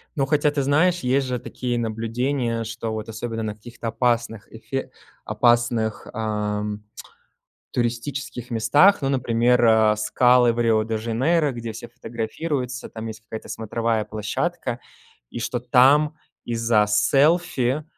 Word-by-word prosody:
Но 140 -4 +1
хотя, 150 +1 +2
ты 145 -1 -1
знаешь, 160 +6 +2
есть 130 0 +1
же 125 -1 -2
такие 125 0 -4
наблюдения, 115 +2 -1
что 110 0 -5
вот 110 0 -5
особенно 115 +1 -4
на 105 -1 -3
каких-то 115 +2 -9
опасных 115 -2 -1
эфе 130 +4 -5 0.3
опасных, 120 -2 +1
ам, 105 -1 -3 0.9
туристических 125 +1 -3
местах, 145 - +4
ну, 135 - +1
например, 125 -2 +2
э, 110 -1 +5
скалы 125 +2 +4
в 115 - -7
Рио-де-Жанейро, 115 +7 +1
где 115 -2 -6
все 115 +2 -8
фотографируются, 125 +3 -4
там 110 0 -7
есть 110 -1 -7
какая-то 110 0 -9
смотровая 115 0 -1
площадка, 120 +5 -3 0.5
и - - -6
что 120 +1 -2
там 140 +5 +4 0.3
из-за 115 -2 +2
селфи, 140 +3 +2
120 Hz, 125 wpm, -23 LUFS, 110-130 Hz, 0.9 s, э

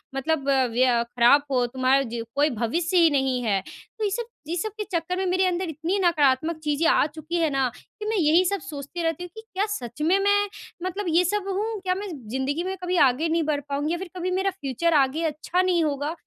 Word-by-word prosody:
मतलब 280 +1 -1 0.2
वया 245 0 +3
खराब 245 +4 +4
हो 250 -2 +2
तुम्हारा 260 +2 +2
जो 230 0 -4
कोई 290 +2 +3
भविष्य 315 - -1
ही 335 -2 +6
नहीं 265 -3 +1
है।" 200 -4 +1
तो 440 - -10
ये 415 - +2
सब 470 +4 -2 0.2
ये 335 - -2
सब 435 +5 -2
के 425 - -2
चक्कर 345 +1 -1
में 380 - -1
मेरे 370 +1 +2
अंदर 360 0 -1
इतनी 325 +6 -2
नकारात्मक 310 -1 +2
चीज़ें 300 +2 +1
आ - - +4
चुकी 315 +2 -7
है 325 -2 +2
ना 270 -2 +1
कि 425 - -12
मैं 440 0 0
यही 335 +1 +4
सब 400 +2 0
सोचती 295 +3 -6
रहती 330 +1 -1
हूँ 355 - -8
कि 440 - -8
क्या 410 -2 -2
सच 240 +3 -7
में 340 +5 +3
मैं 405 +1 +2 0.3
मतलब 370 +3 -3
ये 335 +2 +4
सब 400 +2 -1
हूँ? 420 +3 -2
क्या 370 -1 0
मैं 405 +2 -5 0.2
ज़िन्दगी 265 +7 -1
में 380 +1 -3
कभी 360 0 0
आगे 300 +7 -1
नहीं 330 0 +1
बढ़ 285 - -2
पाऊँगी 285 +2 -1
या - - -1
फिर 370 +1 -7
कभी 365 +1 -2
मेरा 380 +2 +1
फ्यूचर 335 -1 -1
आगे 290 +2 +2
अच्छा 320 +4 0
नहीं 360 -2 +2
होगा? 290 0 -1
325 Hz, 230 wpm, -25 LUFS, 280-370 Hz, 0.3 s, ही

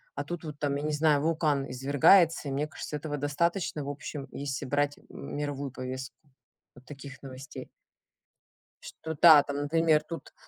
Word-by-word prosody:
а - - -3
тут 175 -1 -6
вот 150 -2 -7
там, 145 -1 0
я - - -4
не 155 0 -1
знаю, 150 -1 +3
вулкан 155 -3 0
извергается, 145 +6 +4
и - - -3
мне 145 +3 -1
кажется, 150 - -7
этого 150 0 -4
достаточно, 150 +3 -1
в 140 - -5
общем, 145 -1 -6
если 140 -1 -4
брать 145 +2 0
м - - -10
мировую 145 -2 -3
повестку 130 -1 -6 0.6
вот 125 - -17
таких 140 -2 -10
новостей. 135 0 -9 1.3
Что 160 -1 -4
да, 155 -4 +9
там, 140 0 -4
например, 155 +1 +2
тут 165 +1 -8
145 Hz, 165 wpm, -28 LUFS, 140-155 Hz, 1.3 s, да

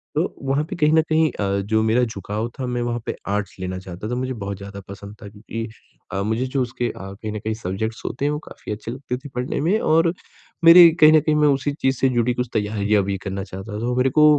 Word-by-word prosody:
तो 155 - +3 0.2
वहाँ 135 +2 +1
पे - - -4
कहीं 150 -2 +3
न 160 - +6
कहीं 160 0 +3
अ, 100 -1 0
जो 110 +2 +1
मेरा 115 +3 +3
झुकाव 110 0 -3
था 130 - -2
मैं 120 0 -2
वहाँ 120 0 -1
पे - - -3
आर्ट्स 100 0 -2
लेना 95 0 -3
चाहता 95 +3 -7
था। 125 - -1
मुझे 130 +1 -2
बहुत 100 -4 -5
ज़्यादा 100 0 -8
पसंद 100 +1 -9
था 105 - -8
क्योंकि 110 +2 -6 0.5
अ, 100 - -1
मुझे 110 +4 0
जो 130 +1 -1
उसके 120 -1 -2
अ, - - -6 0.2
कहीं 105 +2 -6
न 105 - -4
कहीं 110 +1 -2
सब्ज़ेक्ट्स 110 +2 -4
होते 135 +4 -2
हैं 145 - +2
वो 150 - -2
काफ़ी - - -9
अच्छे 105 +2 -5
लगते 125 0 -4
थे, 140 +3 -10
पढ़ने 125 +3 -2
में 185 +8 +2
और 165 -1 +3 0.5
मेरे 170 +1 +10
कहीं 155 0 +8
न 155 - +7
कहीं 155 0 +1
मैं 150 0 +4
उसी 140 0 +1
चीज़ 130 0 +2
से 135 - +3
जुड़ी 120 -1 +1
कुछ 125 0 -2
तैयारियाँ 105 -1 +1
भी 100 0 -2
करना 95 0 -3
चाहता 95 +2 -8
था। 115 - -3
वो 125 0 0
मेरे 125 +1 +3
को 150 - +8
120 Hz, 255 wpm, -22 LUFS, 105-135 Hz, 0.5 s, मेरे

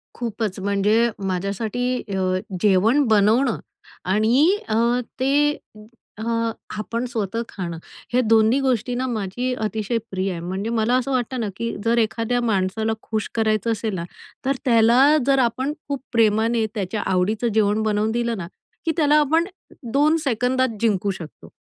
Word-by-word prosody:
खूपच 220 -4 -3
म्हणजे 205 +4 +2 0.2
माझ्यासाठी 200 +6 -2 0.3
अ, 185 0 +1 0.2
जेवण 215 +8 +4
बनवणं 220 +4 +3 0.5
आणि 240 - +3
अ, - - +1 0.4
ते 290 +3 +2 0.6
अ, 220 - -6 0.5
आपण 230 +4 -3
स्वतः 230 -1 -2
खाणं. 170 -4 -5 0.4
हे 250 - +4
दोन्ही 225 +3 +4
गोष्टीना 250 0 0
माझी 240 +3 -2
अतिशय 220 +2 -2
प्रिय 190 0 -1
आहे. 170 - -5
म्हणजे 190 +5 -4
मला 230 +1 +1
असं 265 +2 -2
वाटतं 255 0 -1
ना, 220 - -1
की 230 0 -3
जर 235 +1 +2
एखाद्या 230 +2 0
माणसाला 220 0 0
खुश 220 -1 -3
करायचं 220 0 +1
असेल 220 -1 -2
ना, 170 - -3 0.4
तर 275 0 +1
त्याला 245 +5 +5
जर 270 -1 +4
आपण 260 +4 0
खूप 280 -2 -3
प्रेमाने 225 0 +3
त्याच्या 205 +1 -2
आवडीचं 210 +6 +1
जेवण 210 0 +2
बनवून 215 0 +1
दिलं 235 -1 -1
ना, 170 - -5 0.4
की 325 - +2
त्याला 300 -2 +4
आपण 320 +3 +2 0.5
2 300 +3 +4
सेकंदात 250 -1 0
जिंकू 205 -3 +1
शकतो. 160 -3 -11
225 Hz, 145 wpm, -22 LUFS, 205-250 Hz, 0.6 s, त्याला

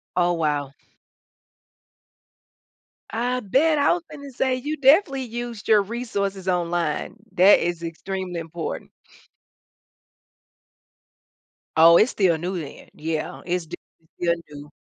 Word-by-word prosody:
Oh, 175 -1 +2
wow. 145 -4 -1 2.4
I 245 +3 -1
bet, 295 +10 +2
I 285 +3 +4
was 350 -1 -3
gonna 285 -2 -10
say 255 +1 0
you 295 +5 -4
definitely 275 0 +4
used 235 -2 -6
your 215 -2 +5
resources 200 -4 -4
online, 175 -1 -1 0.2
that 190 +3 +6
is 175 -1 -2
extremely 180 +2 -5
important. 165 0 -6 2.9
Oh, 165 +1 +8
it's 220 +7 +4
still 180 -5 +2
new 180 +2 -3
then, 150 - -10
yeah, 155 0 -4
it's 180 -1 -1
d - - -7 0.4
still 170 -1 +2 0.2
new. 145 0 -10
190 Hz, 115 wpm, -23 LUFS, 170-245 Hz, 2.9 s, Oh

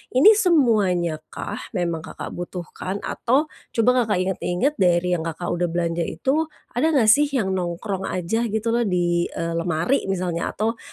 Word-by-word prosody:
ini 350 +12 +8
semuanyakah, 205 - +1 0.2
memang 170 -2 -1
Kakak - - -7
butuhkan? 180 +2 -6
Atau 275 +6 0 0.3
coba 245 +1 +3
Kakak 210 -3 0
inget-inget 190 +7 0
dari 180 -1 +3
yang 160 - -5
Kakak 165 +2 -4
udah 175 0 0
belanja 170 0 -1
itu, 280 - 0 0.2
ada 315 +6 +1
nggak 225 -6 +4
sih 290 +5 +4
yang 240 -9 -1
nongkrong 190 +2 -3
aja 225 +7 -1
gitu 220 +1 -1
loh 235 -2 +1
di, 175 -1 +1
eee, 170 0 -4
lemari 170 - 0
misalnya 180 -3 -2
atau 225 +2 -1
190 Hz, 155 wpm, -23 LUFS, 175-235 Hz, 0.3 s, ini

